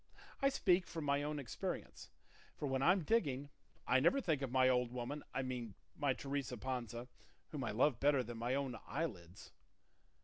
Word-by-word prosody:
I 275 - +5
speak 185 -8 +3
from 160 -3 -4
my 140 0 +2
own 150 +1 -2
experience; 130 -7 -5 0.5
for - - -3
when 135 -1 0
I'm 180 +5 +4
digging 145 - +1 0.3
I 130 - +4
never 170 - +4
think 160 - 0
of 135 -3 -2
my 130 0 +5
old 125 -2 +3
woman; 125 +4 -4
I 135 - -1
mean 125 -5 -4 0.2
my 140 -3 +2
Teresa 135 -2 -3
Panza, 120 -1 -4 0.4
whom 145 -4 -4
I 115 - -1
love 120 +4 +3
better 140 -2 +4
than 120 0 -7
my 120 +3 0
own 135 -3 -1
eyelids." 100 - -4
135 Hz, 175 wpm, -38 LUFS, 125-150 Hz, 0.5 s, I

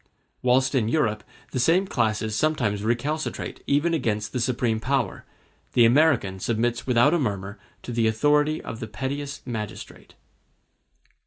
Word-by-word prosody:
Whilst 130 +2 +3
in 120 -5 +1
Europe 110 -6 0 0.3
the 130 - -2
same 170 +9 +3
classes 110 - -1
sometimes 120 -10 0
recalcitrate 140 +8 -2
even 150 +4 +2
against 110 -8 -1
the 125 - -1
supreme 120 -2 0
power, 130 -4 -1 0.5
the 120 - +6
American 120 -7 +3
submits 120 +4 -1
without 125 +4 +4
a 175 - +2
murmur 100 -5 -3 0.2
to - - -6
the 115 -1 +1
authority 150 +7 +2
of 115 - -7
the 110 - -5
pettiest 140 +5 -5
magistrate. 110 -4 -7
120 Hz, 140 wpm, -25 LUFS, 110-145 Hz, 0.5 s, the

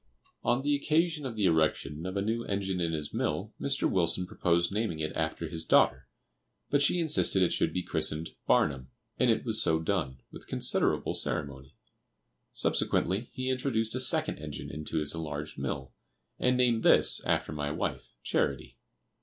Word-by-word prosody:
On 120 +2 +1
the 145 0 +2
occasion 155 0 +1
of 120 - -6
the 105 -2 0
erection 80 -1 +1
of 95 +2 -4
a 100 - 0
new 115 +2 -1
engine 95 -2 -2
in 85 -1 0
his 75 -2 -4
mill, - - -2
Mr. - - +1
Wilson 90 0 +1
proposed 85 -3 +1
naming 105 -5 -1
it 80 0 -3
after 80 +1 -2
his 80 +1 -3
daughter, 65 -5 +3 0.6
but 145 - +3
she 145 +5 +4
insisted 155 - +4
it 90 - +2
should - - +1
be 90 - -2
christened 80 0 -1 0.2
"Barnum," 65 -3 +2 0.3
and - - +3
it - - +1
was - - +2
so 80 0 +2
done, 80 -7 -2
with - - -12
considerable - - +1
ceremony. 70 -3 -4 0.8
Subsequently 100 +7 0
he 130 -1 -2
introduced 115 -4 -1
a 130 - -1
second 130 - 0
engine 75 -3 -7
into 75 +2 -5
his 75 -2 0
enlarged 75 -2 -5
mill, 65 -1 -4 0.5
and 125 0 +2
named 120 -3 +3
this, - - +4
after - - 0
my 75 -1 -3
wife, 75 - -3
"Charity." - - -1
85 Hz, 170 wpm, -29 LUFS, 75-115 Hz, 0.8 s, she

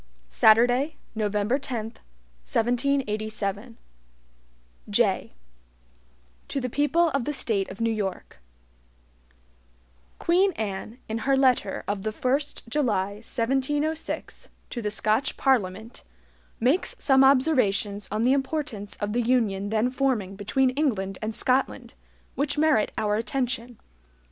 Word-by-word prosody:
Saturday, 245 - +4 0.2
November 210 +3 0
10, 250 -6 -3 0.6
1787 220 - -1 1.1
JAY - - +1 1.1
To 275 - -2
the 250 -2 -4
People 325 +5 +2
of 275 -4 -1
the - - -1
State 210 -8 -1
of 195 - -9
New 230 0 +1
York: 195 - -4 1.8
QUEEN 370 +3 +3
ANNE, 215 -1 -5
in 220 +1 -3
her 270 +4 +2
letter 255 -7 +2
of 205 -1 -2
the 215 - -2
1st 260 +5 -2
July, 225 -7 0
1706, 270 +8 -2 0.2
to 240 - -4
the 210 - -1
Scotch 215 +5 0
Parliament, 220 -4 0 0.6
makes 265 +10 +1
some 270 -1 +4
observations 245 -8 +2
on 215 +2 0
the 255 +2 +4
importance 270 -7 -3
of 205 0 -3
the 245 - +1
UNION 220 -5 +1
then 220 +3 +1
forming 250 -8 0
between 255 +6 +1
England 215 -10 -1
and 215 0 -3
Scotland, 255 +2 0 0.4
which 285 +1 -1
merit 295 -8 +3
our 210 0 +1
attention. 245 0 -2
235 Hz, 115 wpm, -26 LUFS, 210-270 Hz, 1.8 s, Saturday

